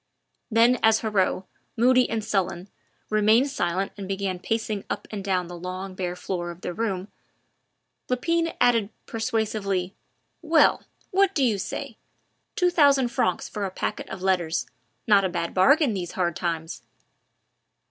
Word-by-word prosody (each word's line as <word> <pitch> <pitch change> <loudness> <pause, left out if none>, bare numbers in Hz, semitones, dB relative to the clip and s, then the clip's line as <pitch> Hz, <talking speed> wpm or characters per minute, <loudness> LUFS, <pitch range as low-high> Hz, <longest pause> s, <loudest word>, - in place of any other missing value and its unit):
Then 235 +2 +4
as 220 0 +4
Heriot, 195 -4 +1 0.3
moody 250 +2 +4
and 220 -2 -2
sullen, 190 -3 -1 0.4
remained 220 +6 +4
silent 190 -5 -1
and 195 - -5
began 195 -1 -2
pacing 220 0 -2
up - - -4
and 205 -2 -5
down 185 -2 0
the 175 +1 -8
long, 185 +2 -6
bare 180 -1 -3
floor 180 -1 -4
of 170 +1 -9
the 180 - -4
room, 200 -2 -3 1.0
Lepine 330 +6 0
added 230 -4 +3 0.2
persuasively, 210 -4 -2 0.5
"Well! 320 -2 +3 0.3
what 390 0 +3
do 280 - +2
you 220 -6 +2
say? - - -5 0.6
Two 360 0 +2
thousand 280 -6 +4
francs 185 -6 0
for 210 - -5
a 195 - -1
packet 185 - -4
of 190 -1 -7
letters 175 -4 +1 0.4
not 205 -2 +5
a 190 - +1
bad 170 -1 -3
bargain 275 - +4
these 180 -3 -4
hard 175 -3 0
times." 165 -2 -3
200 Hz, 145 wpm, -25 LUFS, 185-235 Hz, 1.0 s, not